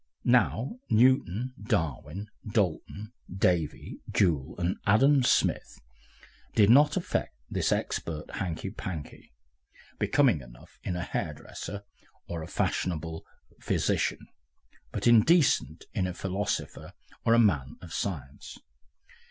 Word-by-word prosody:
Now 125 - +2
Newton, 125 0 +3
Darwin, 100 - -2
Dalton, 105 +1 -2 0.2
Davy, 90 -4 0
Joule, 75 -9 +1
and 90 +1 -1
Adam 135 +7 +5
Smith 125 - +1 0.8
did 105 0 +6
not 145 +5 +6
affect 180 - -2 0.2
this - - 0
"expert" 80 -2 -2
hankey 95 0 -3
pankey, 90 - -7 0.7
becoming 135 - +3
enough - - -16
in 90 - -2
a 90 - -2
hairdresser 90 +6 -5 0.4
or 85 -1 -4
a 80 - -6
fashionable 80 -2 -2 0.3
physician, - - 0 0.7
but - - -4
indecent 125 +7 +4
in 95 - 0
a 90 - -5
philosopher 95 +2 -3 0.3
or 115 - +4
a - - +4
man 80 - +2
of 85 -2 -10
science. 70 -8 -5
95 Hz, 110 wpm, -28 LUFS, 80-115 Hz, 0.8 s, did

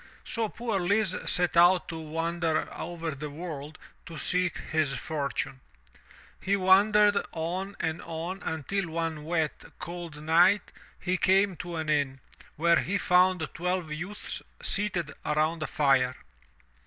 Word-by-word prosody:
So 225 -2 -2
poor 230 -3 -2
Lise 195 +2 +2 0.2
set 180 -1 +1
out 175 +1 +6
to 165 -1 -5
wander 165 +1 -1
over 165 -1 -4
the 150 +2 -6
world 155 -1 -7 0.3
to 165 - -8
seek 180 +3 0
his 155 -4 -1
fortune. 140 -3 -3 0.8
He 195 +1 +2
wandered 205 +2 +5 0.2
on 180 +5 -3
and 160 0 -2
on 170 +4 -5
until 165 +4 -2
one 160 -2 -3
wet, 160 -2 -1
cold 170 -3 -7
night 175 +5 +4 0.3
he 185 0 0
came 195 +1 +3
to 175 -1 -6
an 160 -1 -3
inn, 140 -3 +1 0.4
where 170 +2 +4
he 200 +3 -1
found 180 -2 +3
twelve 180 -2 -2
youths 180 +7 -5 0.2
seated 185 -7 0
around 155 +2 +1
a 155 - -1
fire. 135 -3 +2
170 Hz, 135 wpm, -28 LUFS, 155-185 Hz, 0.8 s, out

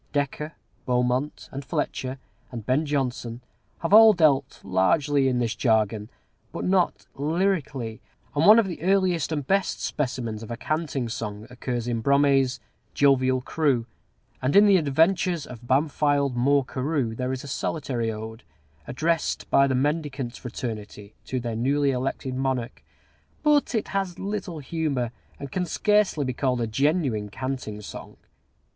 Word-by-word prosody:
Dekker, 145 +2 -2 0.3
Beaumont 125 +3 0
and 140 +1 -6
Fletcher, 130 0 -3 0.3
and 115 -4 -7
Ben 140 +6 +1
Jonson 125 -4 -2 0.4
have 165 +4 -1
all 220 0 +9
dealt 145 -6 +2
largely 135 - +2
in 125 -1 +1
this 120 -2 0
jargon, 110 -2 +1 0.4
but - - -4
not 185 -1 +1
lyrically; 145 - -1 0.3
and 150 +5 +3
one 215 +2 +10
of 230 - +4
the 180 -3 -6
earliest 185 -3 +2
and 145 -3 -2
best 195 +6 +1
specimens 120 -6 -3
of 115 - -9
a 120 - -4
canting 150 -3 -2
song 105 -2 -5
occurs 125 -1 -3
in 115 -2 -1
Brome's 135 -1 +3 0.4
"Jovial 130 -2 +3
Crew;" 135 -4 0 0.6
and 130 +3 0
in 205 +1 +8
the 200 -2 +6
"Adventures 165 +2 +2
of 120 -1 -11
Bamfylde 145 -1 +2
Moore 140 +2 +3
Carew" 130 -3 -1
there 125 +3 -2
is 130 -1 -4
a - - -8
solitary 125 -5 -2
ode, 110 +1 -7 0.5
addressed 165 +4 -1
by 140 0 +5
the 130 - 0
mendicant 140 -3 -1
fraternity 110 -4 -7
to 130 - -2
their 120 -2 -4
newly 140 +4 +2
elected 130 0 -3
monarch; 130 -2 -2 0.6
but 295 -4 +3
it 220 - -1
has 195 -2 -2
little 195 -4 -4
humor, 140 -5 -2 0.3
and 140 -2 -7
can 180 -1 -1
scarcely 210 -5 +2
be 130 - -2
called 125 -1 0
a 115 - 0
genuine 130 - 0
canting 125 -3 -5
song. 105 - -9
135 Hz, 150 wpm, -25 LUFS, 120-155 Hz, 0.6 s, one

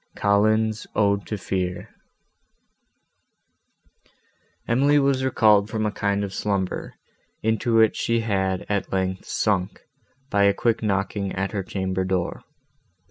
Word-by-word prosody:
COLLINS' 110 +2 +1
ODE 100 -1 +1
TO 105 - -3
FEAR 90 -2 -3 2.8
Emily 140 +5 +3
was 135 -2 +2
recalled 105 -5 +4
from 110 0 -2
a 105 - 0
kind 100 0 -1
of 100 -1 -5
slumber, 100 -3 -2 0.5
into 110 +1 +1
which 110 -1 +4
she 115 0 0
had, 95 -4 -1
at 100 -1 -2
length, 95 -1 -2
sunk, 95 -4 -1 0.5
by 100 -1 +3
a 100 0 +3
quick 115 +1 0
knocking 100 -1 -1
at 95 +1 -2
her 105 - -2
chamber 95 0 -2
door. 95 -2 -2
100 Hz, 125 wpm, -24 LUFS, 95-110 Hz, 2.8 s, recalled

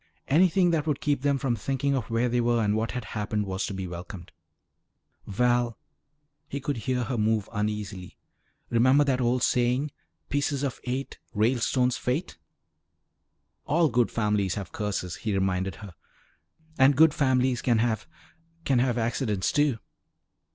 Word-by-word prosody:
Anything 175 +4 +4
that 160 -2 0
would 150 -3 0
keep 145 -3 0
them 140 0 +2
from 130 -2 0
thinking 135 +3 -1
of 125 -6 -2
where 115 +2 +1
they 120 0 +1
were 120 0 +2
and 105 0 +1
what 110 +1 -1
had 125 -4 -4
happened 105 0 -2
was 95 0 -2
to - - -5
be 95 -1 -4
welcomed. 90 +1 -8 1.0
"Val" 120 +2 +1 0.7
he 140 - -4
could 140 -1 -3
hear 125 +1 -1
her 120 0 -2
move 110 -1 +1
uneasily 105 -3 -4 0.5
"remember 130 +5 +5
that 130 -3 0
old 125 0 +1
saying: 125 +4 +1 0.4
'Pieces 145 -1 -1
of 135 -3 -3
eight 130 +2 -4 0.2
Ralestones' 125 +3 +2
fate?" 125 - -2 1.3
"All 165 +1 +3
good 120 -1 +2
families 105 -4 0
have 100 -4 -6
curses," 95 -5 -3
he 105 -2 -2
reminded 95 0 0
her. 100 -4 -10 0.9
"And 135 +1 +6
good 160 0 +6
families 130 -3 +2
can 120 -3 +2
have 110 -1 0 0.6
can 130 -3 +3
have 125 -1 +1
accidents, 115 -4 0
too." 145 -5 +2
120 Hz, 150 wpm, -27 LUFS, 105-135 Hz, 1.3 s, And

